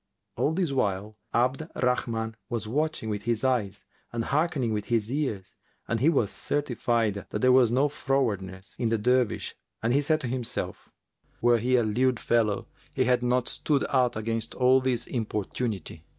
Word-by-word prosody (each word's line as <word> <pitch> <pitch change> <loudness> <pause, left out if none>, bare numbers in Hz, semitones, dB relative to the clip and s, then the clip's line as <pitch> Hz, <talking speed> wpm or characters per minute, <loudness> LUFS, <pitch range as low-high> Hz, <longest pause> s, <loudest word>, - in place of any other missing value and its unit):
All 155 - +1
this 175 -3 0
while 105 -4 -1 0.2
Abd 130 +7 +1
al - - -5
Rahman 115 -3 0
was 115 -3 -3
watching 150 0 -1
with 105 -2 -2
his 115 +1 -1
eyes 125 -7 0 0.3
and 115 -1 -2
hearkening 140 -5 0
with 105 -1 -2
his 115 -2 0
ears, 110 -10 -2 0.3
and 115 - 0
he 140 +7 +4
was 125 - +1
certified 120 -6 0 0.2
that 105 - -3
there 130 - +5
was 125 -2 +6
no 130 +5 +3
frowardness 105 -10 -2
in 115 - +1
the 115 - +2
Dervish 125 +1 +1 0.3
and 115 +2 +2
he 140 - +4
said 155 +2 +2
to 130 - -3
himself, 125 -1 -4 0.5
"Were 120 0 +4
he 125 +3 +2
a 120 - +4
lewd 120 +3 +1
fellow, 110 -4 +1 0.3
he 130 - +3
had 125 0 +2
not 125 0 +1
stood 145 -3 0
out 125 -3 +2
against 115 +1 -3
all 130 +1 +4
this 125 -2 0
importunity." 105 -6 -3
120 Hz, 175 wpm, -27 LUFS, 110-130 Hz, 0.5 s, was